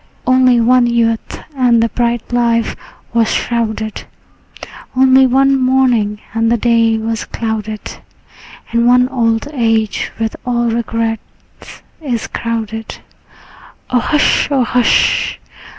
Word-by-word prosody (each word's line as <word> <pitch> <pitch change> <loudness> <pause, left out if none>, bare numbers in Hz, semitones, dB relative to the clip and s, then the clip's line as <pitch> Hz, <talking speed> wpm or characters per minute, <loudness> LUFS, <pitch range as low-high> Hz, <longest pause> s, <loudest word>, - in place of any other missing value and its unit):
Only 255 -1 +4
one 245 +1 +3
youth, 230 -1 -1 0.2
and 240 -3 +3
the 230 - 0
bright 240 0 -2
life 235 -1 +1 0.4
was 230 -1 +2
shrouded; 220 -2 -2 0.9
Only 260 0 +5
one 270 +2 +3
morning, 250 -5 +1
and 225 0 +1
the 235 - +2
day 230 -1 +2
was 225 0 -3
clouded; 220 -2 -5 0.7
And 235 +1 +2
one 250 +1 +4
old 230 -1 0
age 225 -5 0
with 225 -1 -3
all 240 -1 0
regrets 230 -1 -5 0.2
is 245 -7 -3
crowded. 225 -1 -5 0.9
O 250 - +3
hush, 295 +4 +1
O 275 -3 +2
hush! 245 0 +1
235 Hz, 115 wpm, -15 LUFS, 225-250 Hz, 0.9 s, Only